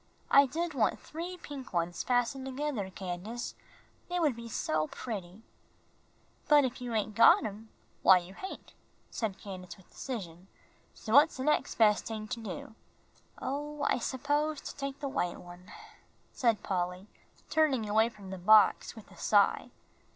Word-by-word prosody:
"I 280 0 +7
did 330 +5 -3
want 250 -6 +1
three 345 +3 -7
pink 275 - -9
ones 175 0 -1
fastened 250 +2 0
together, 265 -7 -3
Candace, 190 +5 -5 0.6
they 355 0 -1
would 300 -7 +2
be 235 0 -8
so 155 -7 -1
pretty." 200 -2 -7 1.0
"But 295 -2 +6
if 255 0 -4
you 245 -2 -4
hain' 215 0 0
got 230 +2 +6
'em, 215 +1 -7 0.3
why 190 - +8
you 180 +1 -6
hain'," 380 - -8 0.5
said 215 -5 -3
Candace, 185 -3 -9
with 190 - -21
decision; 185 -8 -7 0.5
"so 220 - -5
what's 290 +3 +6
de 260 - -3
nex' 300 +2 +1
bes' 210 -2 +4
ting 215 -1 -6
to 240 - -3
do?" 215 0 -7 0.7
"Oh, 295 +2 -4
I - - +2
suppose 290 +5 -1
to - - -8
take 275 0 -5
the 285 - -3
white 180 -9 -2
one," 175 +2 -13 0.6
said 230 -5 +1
Polly, 180 0 -2 0.5
turning 280 -8 +2
away 220 +2 +3
from 200 -4 -12
the 190 - -6
box 215 +6 +5
with 220 - -13
a - - -16
sigh. 205 -2 +3
225 Hz, 160 wpm, -31 LUFS, 190-275 Hz, 1.0 s, why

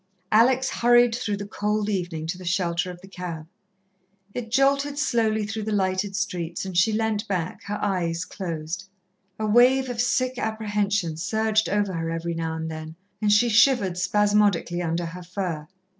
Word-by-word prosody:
Alex 255 +4 +4
hurried 240 0 +4
through 220 -4 -2
the 205 - -5
cold 210 0 -1
evening 175 -6 -2
to 165 - -3
the 185 - -10
shelter 175 0 0
of 180 -1 -8
the 195 - -13
cab. 180 -4 -6 0.9
It 240 -2 -5
jolted 280 +3 +2
slowly 225 -6 +1
through 215 +1 -4
the 215 +1 -3
lighted 195 0 0
streets, 180 -4 -3
and 190 -2 -6
she 200 +6 +4
leant 220 0 -1
back, 180 -3 -3
her 205 +1 -3
eyes 180 -4 -1
closed. 180 0 -5 0.5
A 220 - -2
wave 250 +4 +4
of 240 -1 -1
sick 255 +1 0
apprehension 205 -6 -1
surged 220 +4 +1
over 205 -1 0
her 165 -1 -2
every 165 +1 -3
now 165 -1 -3
and 160 0 -4
then, 155 0 -7 0.3
and 210 -1 +3
she 210 +4 +5
shivered 230 -4 +4
spasmodically 205 -2 +2
under 170 0 -1
her 175 +2 -7
fur. 175 -4 -4
205 Hz, 170 wpm, -25 LUFS, 175-220 Hz, 0.9 s, she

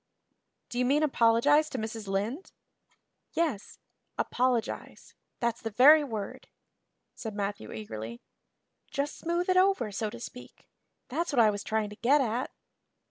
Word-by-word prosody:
"Do 245 - -3
you 250 - +2
mean 290 +4 +3
apologize 290 +3 +4
to - - -4
Mrs. 220 -1 -5
Lynde?" 210 - -2 0.8
"Yes 305 -12 -2 0.4
apologize 250 -2 -1 0.3
that's 235 -1 -1
the 225 - -3
very 285 +8 +7
word," 220 -7 -6 0.7
said 220 -3 -7
Matthew 200 - -4
eagerly. 110 +2 -7 0.7
"Just 285 +1 -2
smooth 345 +1 -1
it 370 0 +3
over 370 - +3
so 210 +2 -2
to - - -9
speak. 250 +1 -11 0.4
That's 325 +7 -1
what 270 - +1
I 220 -2 +6
was 205 0 -5
trying 215 -1 -1
to - - -8
get 275 +5 +4
at." 245 -1 -1
235 Hz, 140 wpm, -29 LUFS, 210-290 Hz, 0.8 s, very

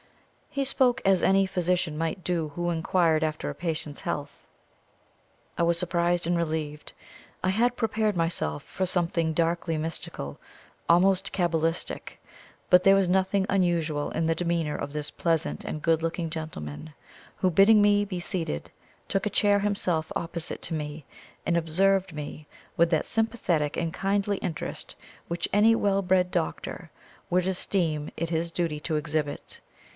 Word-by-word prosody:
He 275 -1 -1
spoke 260 -1 +3
as 195 -1 +4
any 195 0 +4
physician 180 -3 0
might 165 +3 -2
do 170 -4 0
who 175 0 -1
inquired 165 -1 +2
after 155 -1 -2
a - - -5
patient's 155 -4 -4
health. - - -5 1.1
I - - +2
was 170 0 +3
surprised 175 0 +1
and 175 - +2
relieved. 155 -3 -3 0.5
I 185 - +2
had 235 +5 +2
prepared 220 -3 0
myself 165 - -1
for 190 - -2
something 170 -2 +1
darkly 165 0 0
mystical, 155 - -5 0.5
almost 190 +3 +4
cabalistic; 165 -2 -1 0.5
but 180 0 +6
there 195 +1 +7
was 195 -2 +3
nothing 190 +1 +2
unusual 170 -6 +1
in 160 - -1
the 165 0 +2
demeanour 170 -3 -1
of 140 - -4
this 150 0 -4
pleasant 160 - -1
and 155 - -5
good 165 -1 +3
looking 165 0 -2
gentleman 155 - -6 0.4
who, 185 - +2
bidding 200 +5 +6
me 205 0 +4
be 190 -3 -4
seated, 175 - -3 0.4
took 195 +1 -1
a - - 0
chair 205 0 +3
himself 185 -6 0
opposite 170 0 -4
to - - -4
me, 150 -1 -4 0.4
and 170 - +1
observed 185 +3 +2
me 150 0 -7 0.3
with 170 0 +4
that 160 -3 +1
sympathetic 205 -10 0
and 165 -1 -1
kindly 200 +1 0
interest 170 -6 -4 0.3
which 170 0 -2
any 220 +3 +6
well 200 -3 +2
bred 185 -1 +2
doctor 80 - -3 0.4
would 180 +1 +2
esteem 170 -5 0
it 165 0 -2
his 165 +1 0
duty 165 -3 -2
to 155 +1 -2
exhibit. 150 -1 -3
170 Hz, 150 wpm, -27 LUFS, 160-190 Hz, 1.1 s, there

